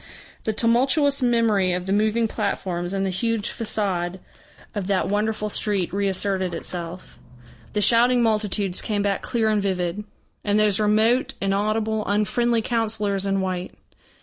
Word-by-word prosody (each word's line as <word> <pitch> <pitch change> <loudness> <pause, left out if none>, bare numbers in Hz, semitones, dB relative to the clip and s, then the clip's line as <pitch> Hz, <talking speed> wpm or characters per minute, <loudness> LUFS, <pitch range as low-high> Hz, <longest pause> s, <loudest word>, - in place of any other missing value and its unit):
The 220 - +1
tumultuous 265 +6 +3
memory 225 -7 +2
of 180 0 -2
the 190 - 0
moving 220 +2 +2
platforms 185 -5 -2
and 195 0 -1
the 190 - -1
huge 225 +2 -1
façade 190 -5 -2 0.6
of 200 -3 -3
that 195 -2 +1
wonderful 210 +1 -1
street 200 -4 -1
reasserted 195 -2 -1
itself. 175 +1 -6 0.5
The 210 - 0
shouting 240 +3 +5
multitudes 210 -4 0
came 205 -2 -1
back 200 -1 0
clear 225 -2 0
and 215 -1 +2
vivid, 185 0 -2 0.4
and 205 0 +2
those 210 -2 +3
remote, 220 +4 +2
inaudible, 215 +2 0
unfriendly 220 +3 +1
councillors 210 -4 -1
in 195 0 +1
white. 185 -1 -4
210 Hz, 140 wpm, -23 LUFS, 190-220 Hz, 0.6 s, shouting